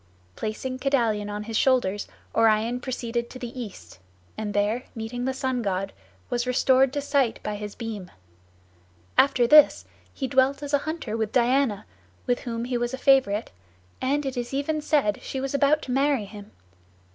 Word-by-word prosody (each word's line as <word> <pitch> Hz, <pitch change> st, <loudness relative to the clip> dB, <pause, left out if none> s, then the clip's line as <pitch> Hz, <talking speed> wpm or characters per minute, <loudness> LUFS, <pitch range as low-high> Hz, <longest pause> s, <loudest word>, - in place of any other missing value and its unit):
Placing 255 Hz, +4 st, -4 dB
Kedalion 230 Hz, -7 st, +1 dB
on 205 Hz, 0 st, -4 dB
his 225 Hz, +1 st, -6 dB
shoulders, 215 Hz, -6 st, +2 dB, 0.3 s
Orion 225 Hz, +2 st, +3 dB
proceeded 240 Hz, -2 st, -3 dB
to -, -, -9 dB
the 250 Hz, 0 st, -6 dB
east, 95 Hz, -, -10 dB, 0.4 s
and 215 Hz, -1 st, -4 dB
there 210 Hz, +5 st, +1 dB
meeting 235 Hz, +2 st, -4 dB
the 265 Hz, -, +1 dB
sun 260 Hz, -2 st, -1 dB
god, 195 Hz, -2 st, -2 dB, 0.3 s
was 240 Hz, +1 st, -1 dB
restored 260 Hz, +1 st, +4 dB
to 290 Hz, -, -1 dB
sight 280 Hz, -4 st, +1 dB
by 210 Hz, -, -3 dB
his 210 Hz, 0 st, -6 dB
beam. 215 Hz, -6 st, -6 dB, 1.1 s
After 260 Hz, -3 st, +4 dB
this 300 Hz, +4 st, +6 dB, 0.3 s
he 265 Hz, -, -4 dB
dwelt 270 Hz, +2 st, +2 dB
as 290 Hz, 0 st, -5 dB
a 285 Hz, -, +5 dB
hunter 315 Hz, -9 st, -4 dB
with 220 Hz, -1 st, -1 dB
Diana, 250 Hz, -3 st, +2 dB, 0.4 s
with 245 Hz, -, +1 dB
whom 230 Hz, -1 st, -4 dB
he 245 Hz, -1 st, -1 dB
was 240 Hz, +2 st, -1 dB
a -, -, -11 dB
favorite, 260 Hz, -6 st, +3 dB, 0.5 s
and 280 Hz, +3 st, 0 dB
it 270 Hz, -1 st, -3 dB
is 245 Hz, +2 st, -3 dB
even 305 Hz, +2 st, -1 dB
said 285 Hz, -9 st, +1 dB
she 265 Hz, -, -5 dB
was 270 Hz, +1 st, -3 dB
about 285 Hz, +2 st, +3 dB
to 255 Hz, -, -5 dB
marry 270 Hz, -3 st, +2 dB
him. 205 Hz, 0 st, -11 dB
245 Hz, 170 wpm, -25 LUFS, 215-270 Hz, 1.1 s, this